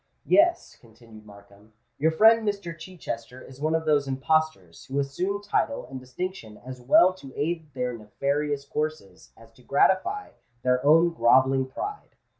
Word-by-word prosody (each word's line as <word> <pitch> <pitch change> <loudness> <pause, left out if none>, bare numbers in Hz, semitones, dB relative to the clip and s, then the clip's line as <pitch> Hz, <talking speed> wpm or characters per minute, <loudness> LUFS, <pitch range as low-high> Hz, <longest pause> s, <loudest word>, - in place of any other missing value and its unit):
"Yes," 345 +2 +3
continued 115 -2 -17
Markham, 100 +1 -18 0.3
"your 155 +3 +3
friend 220 +7 +5
Mr. 200 -5 -3
Chichester 160 -8 -8
is 130 +1 -14
one 155 +1 +1
of 160 0 -2
those 145 -2 +2
impostors 135 - -1
who 135 - -5
assume 180 +9 -2
title 280 +7 -1
and 130 -1 -8
distinction 130 - -7
as 130 -1 -9
well 175 +9 +5
to 140 -8 -13
aid 160 0 -3
their 125 -1 -2
nefarious 140 +6 -2
courses 150 -11 -5
as 115 0 -17
to 115 - -22
gratify 190 - +1 0.3
their 125 0 +1
own 165 +4 +5
grovelling 130 0 +3
pride. 415 - -7
140 Hz, 150 wpm, -25 LUFS, 125-170 Hz, 0.3 s, friend